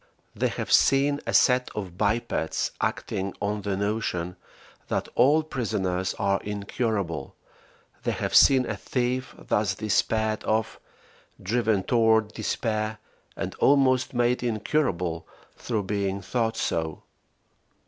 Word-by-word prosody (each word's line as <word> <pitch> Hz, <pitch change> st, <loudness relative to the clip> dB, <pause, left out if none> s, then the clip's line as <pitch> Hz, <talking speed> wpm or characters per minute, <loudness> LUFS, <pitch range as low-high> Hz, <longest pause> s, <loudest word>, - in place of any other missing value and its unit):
They -, -, +1 dB
have -, -, -4 dB
seen 140 Hz, +1 st, +4 dB
a -, -, -1 dB
set 125 Hz, -1 st, +4 dB
of 95 Hz, -5 st, -5 dB
bipeds 105 Hz, -5 st, -1 dB
acting 95 Hz, 0 st, -2 dB
on 105 Hz, +1 st, -2 dB
the 100 Hz, -1 st, -2 dB
notion 100 Hz, -4 st, -2 dB, 0.5 s
that -, -, -2 dB
all 150 Hz, +5 st, +4 dB
prisoners 95 Hz, -10 st, -2 dB
are 100 Hz, 0 st, 0 dB
incurable: 100 Hz, -3 st, -3 dB, 0.7 s
they -, -, -1 dB
have -, -, -3 dB
seen 130 Hz, -2 st, +6 dB
a 110 Hz, -, -3 dB
thief, 125 Hz, +5 st, -2 dB
thus 105 Hz, -2 st, 0 dB
despaired 110 Hz, +1 st, 0 dB
of, 110 Hz, 0 st, -1 dB, 0.6 s
driven 110 Hz, -1 st, +1 dB
toward 110 Hz, 0 st, +3 dB
despair, 110 Hz, 0 st, -2 dB, 0.4 s
and -, -, -4 dB
almost 130 Hz, -2 st, +3 dB
made 120 Hz, +1 st, +2 dB
incurable 110 Hz, -, -1 dB, 0.3 s
through 110 Hz, -4 st, -2 dB
being 100 Hz, 0 st, -1 dB
thought 115 Hz, +1 st, -1 dB
so. 80 Hz, -1 st, -2 dB
110 Hz, 115 wpm, -26 LUFS, 100-120 Hz, 0.7 s, seen